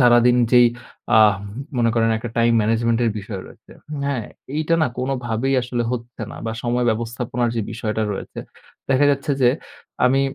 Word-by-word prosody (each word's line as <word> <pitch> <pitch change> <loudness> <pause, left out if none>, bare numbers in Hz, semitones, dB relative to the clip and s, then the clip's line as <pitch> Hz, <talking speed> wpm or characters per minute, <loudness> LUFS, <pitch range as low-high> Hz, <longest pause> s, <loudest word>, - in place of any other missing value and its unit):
সারাদিন 120 0 +5 0.2
যেই 120 -1 +8 0.5
আ - - +7 0.6
মনে 115 -1 +3
করেন 115 -1 +2
একটা 115 0 -6
টাইম 115 0 +4
ম্যানেজমেন্ট 115 +2 +1
এর 115 - +2
বিষয় 100 -1 -6
রয়েছে। - - -16 0.3
হ্যাঁ? 135 -6 -1 0.3
এইটা 155 +2 +1
না - - +4
কোনভাবেই 130 0 -1
আসলে 120 -1 -2
হচ্ছে 120 -1 -6
না - - -9
বা 110 - -2
সময় 120 0 0
ব্যবস্থাপনার 120 +1 -2
যে - - +1
বিষয়টা 110 -1 -2
রয়েছে। - - -7 0.5
দেখা 135 +2 +4
যাচ্ছে 140 +1 -1
যে 120 - +6 0.6
আমি 135 +2 +4
120 Hz, 160 wpm, -21 LUFS, 115-125 Hz, 0.6 s, যেই